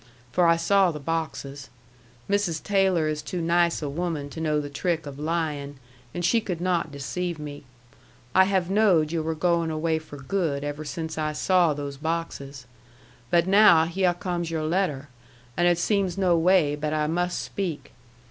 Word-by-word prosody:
For 175 Hz, +5 st, +3 dB
I 165 Hz, -, +5 dB
saw 190 Hz, +3 st, +3 dB
the 155 Hz, -3 st, -5 dB
boxes. 145 Hz, -2 st, -4 dB, 0.6 s
Mrs. 200 Hz, -6 st, 0 dB
Taylor 190 Hz, -5 st, +2 dB
is 155 Hz, -1 st, -2 dB
too 175 Hz, +4 st, -5 dB
nice 170 Hz, 0 st, +1 dB
a -, -, -2 dB
woman 150 Hz, -1 st, -3 dB
to 160 Hz, -, -6 dB
know 155 Hz, -2 st, +1 dB
the 145 Hz, -, -4 dB
trick 160 Hz, +3 st, -2 dB
of 140 Hz, -1 st, -8 dB
lyin', 150 Hz, -3 st, -2 dB, 0.3 s
and 175 Hz, +4 st, -3 dB
she 230 Hz, +5 st, +3 dB
could 180 Hz, -6 st, -4 dB
not 175 Hz, -3 st, 0 dB
deceive 165 Hz, +5 st, -4 dB
me. 145 Hz, -1 st, -8 dB, 0.7 s
I 190 Hz, -, +6 dB
have 190 Hz, -2 st, +1 dB
knowed 190 Hz, -6 st, +3 dB
yu' 165 Hz, -1 st, -1 dB
were 160 Hz, +1 st, -2 dB
going 170 Hz, 0 st, +1 dB
away 160 Hz, 0 st, 0 dB
for 155 Hz, -2 st, -11 dB
good 140 Hz, -1 st, -2 dB
ever 145 Hz, +1 st, -4 dB
since 160 Hz, 0 st, -5 dB
I 155 Hz, 0 st, -1 dB
saw 175 Hz, -1 st, +2 dB
those 140 Hz, -1 st, -5 dB
boxes. 145 Hz, -4 st, -4 dB, 0.6 s
But 170 Hz, -1 st, +3 dB
now 190 Hz, -4 st, +6 dB
hyeh 180 Hz, +1 st, +1 dB
comes 175 Hz, -3 st, -3 dB
your 160 Hz, -1 st, -2 dB
letter, 155 Hz, -4 st, -1 dB, 0.5 s
and 175 Hz, -, +2 dB
it 175 Hz, -1 st, +3 dB
seems 195 Hz, 0 st, 0 dB
no 185 Hz, -3 st, +3 dB
way 165 Hz, -3 st, +3 dB
but 150 Hz, +1 st, -3 dB
I 155 Hz, -1 st, +1 dB
must 175 Hz, +3 st, -1 dB
speak. 180 Hz, -7 st, -4 dB
165 Hz, 175 wpm, -25 LUFS, 150-180 Hz, 0.7 s, I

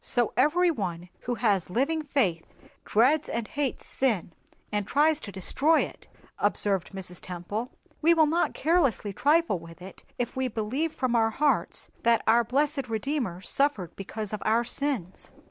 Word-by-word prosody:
"So 240 Hz, -2 st, +1 dB
every 340 Hz, +7 st, +3 dB
one 180 Hz, -, -4 dB, 0.2 s
who 245 Hz, -, +1 dB
has 205 Hz, -6 st, +1 dB
living 280 Hz, -, 0 dB
faith 215 Hz, -, 0 dB, 0.4 s
dreads 275 Hz, +8 st, +3 dB
and 230 Hz, -2 st, -2 dB
hates 285 Hz, -3 st, -2 dB
sin, 225 Hz, -10 st, 0 dB, 0.4 s
and 205 Hz, -1 st, -1 dB
tries 300 Hz, +1 st, +3 dB
to 205 Hz, -, -8 dB
destroy 280 Hz, -, +2 dB
it," -, -, -6 dB, 0.3 s
observed 195 Hz, -4 st, +1 dB
Mrs. 185 Hz, -2 st, -8 dB
Temple. 185 Hz, +7 st, -5 dB, 0.3 s
"We 335 Hz, +2 st, +5 dB
will 320 Hz, -1 st, +5 dB
not 330 Hz, +3 st, +1 dB
carelessly 285 Hz, -, +1 dB
trifle 295 Hz, -, +2 dB
with 165 Hz, 0 st, -13 dB
it 185 Hz, +1 st, -12 dB
if 245 Hz, -, -3 dB
we 260 Hz, 0 st, 0 dB
believe 250 Hz, +8 st, -2 dB
from 255 Hz, -4 st, -1 dB
our 225 Hz, -1 st, +3 dB
hearts 290 Hz, +6 st, 0 dB
that 230 Hz, -1 st, +3 dB
our 235 Hz, +2 st, +5 dB
blessed 275 Hz, +2 st, 0 dB
Redeemer 225 Hz, -, -2 dB
suffered 215 Hz, -, 0 dB
because 210 Hz, +1 st, -6 dB
of 215 Hz, -, -3 dB
our 225 Hz, +2 st, +2 dB
sins." 240 Hz, -8 st, -3 dB
235 Hz, 160 wpm, -27 LUFS, 200-290 Hz, 0.4 s, We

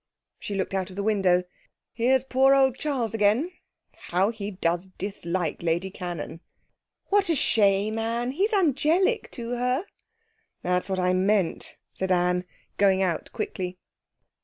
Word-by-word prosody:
She 205 Hz, -, -5 dB
looked 195 Hz, 0 st, -2 dB
out 190 Hz, -1 st, -1 dB
of 185 Hz, -, -11 dB
the 200 Hz, -, -3 dB
window. 190 Hz, -4 st, +3 dB, 0.5 s
'Here's 250 Hz, +2 st, +2 dB
poor 265 Hz, +1 st, +4 dB
old 265 Hz, -2 st, +4 dB
Charles 260 Hz, -7 st, -1 dB
again. 225 Hz, -, +2 dB, 0.6 s
How 190 Hz, +5 st, +2 dB
he 210 Hz, -3 st, -5 dB
does 175 Hz, -2 st, -1 dB
dislike 180 Hz, -4 st, -3 dB
Lady 170 Hz, +3 st, -1 dB
Cannon!' 175 Hz, -4 st, -6 dB, 0.7 s
'What 400 Hz, -2 st, +3 dB
a 330 Hz, -, +3 dB
shame, 210 Hz, -3 st, +3 dB
Anne! 235 Hz, +2 st, -1 dB
He's 390 Hz, -, +1 dB
angelic 360 Hz, -, +2 dB
to 235 Hz, -1 st, -5 dB
her.' 250 Hz, +7 st, 0 dB, 0.8 s
'That's 180 Hz, +2 st, 0 dB
what 190 Hz, -, -1 dB
I 180 Hz, 0 st, +2 dB
meant,' 190 Hz, -1 st, +1 dB, 0.2 s
said 190 Hz, 0 st, -2 dB
Anne, 180 Hz, 0 st, +2 dB, 0.3 s
going 195 Hz, -1 st, +4 dB
out 170 Hz, -4 st, -2 dB
quickly. 180 Hz, 0 st, -4 dB
205 Hz, 140 wpm, -26 LUFS, 185-255 Hz, 0.8 s, poor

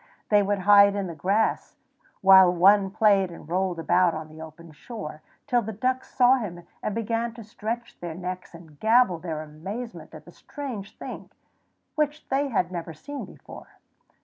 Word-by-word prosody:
They 210 Hz, -1 st, +5 dB
would 205 Hz, 0 st, 0 dB
hide 200 Hz, +1 st, +6 dB
in 200 Hz, -1 st, -2 dB
the 170 Hz, -, -6 dB
grass, 200 Hz, +7 st, 0 dB, 0.5 s
while 190 Hz, -1 st, +8 dB
one 195 Hz, +3 st, +5 dB
played 200 Hz, -2 st, +3 dB
and 170 Hz, -3 st, -12 dB
rolled 180 Hz, +1 st, -1 dB
about 175 Hz, +1 st, +2 dB
on 155 Hz, 0 st, -7 dB
the 155 Hz, +1 st, -12 dB
open 160 Hz, +1 st, -11 dB
shore, 155 Hz, -, -8 dB, 0.2 s
till 245 Hz, -4 st, +2 dB
the 220 Hz, 0 st, -5 dB
ducks 255 Hz, +5 st, -2 dB
saw 255 Hz, +1 st, +5 dB
him 175 Hz, -8 st, -6 dB, 0.2 s
and 210 Hz, -, -3 dB
began 230 Hz, +1 st, -2 dB
to 230 Hz, -, -9 dB
stretch 225 Hz, +3 st, -6 dB
their 170 Hz, -2 st, -6 dB
necks 180 Hz, 0 st, -6 dB
and 160 Hz, -3 st, -15 dB
gabble 220 Hz, -5 st, +3 dB
their 160 Hz, -3 st, -5 dB
amazement 195 Hz, +11 st, -8 dB
at -, -, -12 dB
the -, -, -13 dB
strange 250 Hz, -9 st, -8 dB
thing, -, -, -8 dB, 0.6 s
which 300 Hz, 0 st, -2 dB
they 275 Hz, +2 st, +1 dB
had 190 Hz, -8 st, -1 dB
never 170 Hz, -2 st, -6 dB
seen 285 Hz, -, -7 dB
before. -, -, -14 dB
195 Hz, 175 wpm, -25 LUFS, 175-230 Hz, 0.6 s, while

